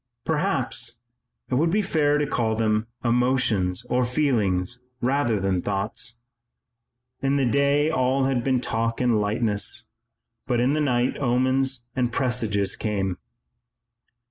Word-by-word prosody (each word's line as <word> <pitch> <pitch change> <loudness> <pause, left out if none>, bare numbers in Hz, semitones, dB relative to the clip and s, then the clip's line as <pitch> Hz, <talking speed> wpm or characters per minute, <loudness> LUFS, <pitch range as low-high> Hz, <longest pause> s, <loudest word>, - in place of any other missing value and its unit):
Perhaps - - -1 0.6
it - - 0
would 155 +6 +3
be 210 +5 +1
fairer 150 -4 +2
to 150 - +1
call 115 -5 0
them 110 0 +1 0.2
emotions 120 -5 +1
or 125 +1 +1
feelings 120 -7 0 0.2
rather 125 -4 +1
than 95 -2 0
thoughts. 110 +4 -3 1.0
In 135 +1 +1
the 140 -2 +2
day 140 +4 +2
all 130 -1 +1
had 130 -2 +1
been 130 -1 +1
talk 115 0 -1
and 120 -4 +2
lightness, 110 +1 0 0.6
but 125 -2 +1
in 125 +4 +2
the 155 - +1
night 125 -3 +1
omens 130 0 +1
and 125 -2 0
presages 110 -6 0
came. 95 -4 -2
120 Hz, 130 wpm, -24 LUFS, 110-135 Hz, 1.0 s, would